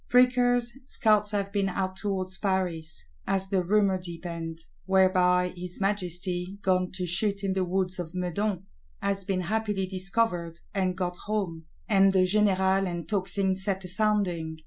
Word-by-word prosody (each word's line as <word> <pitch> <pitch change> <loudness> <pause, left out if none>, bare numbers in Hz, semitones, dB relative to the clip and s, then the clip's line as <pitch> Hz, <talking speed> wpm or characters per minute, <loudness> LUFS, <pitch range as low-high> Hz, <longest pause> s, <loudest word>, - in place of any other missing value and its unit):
Prickers, 245 -1 +4
scouts 215 -5 +2
have 200 -1 -1
been 200 -1 +1
out 185 0 -2
towards 190 -2 -3
Paris, 175 - -2 0.2
as 195 0 0
the 190 -1 +2
rumour 195 0 +3
deepened: 170 -2 -6 0.3
whereby 180 -1 +4
his 180 0 -7
Majesty, 185 -1 -2
gone 185 -1 +2
to 185 -1 -2
shoot 195 +3 0
in 195 -1 +1
the 190 0 +1
Woods 185 0 -1
of 175 0 -5
Meudon, 185 +2 -1 0.3
has 195 0 -1
been 185 -1 0
happily 205 +1 -1
discovered, 185 -3 -1
and 185 -3 0
got 180 -1 -2
home; 180 -7 -2 0.2
and 195 -2 +5
the 190 -1 +5
générale 190 -1 +3
and 170 -2 -4
tocsin 190 0 0
set 190 0 -2
a - - -6
sounding. 180 -5 0
190 Hz, 150 wpm, -28 LUFS, 180-200 Hz, 0.3 s, and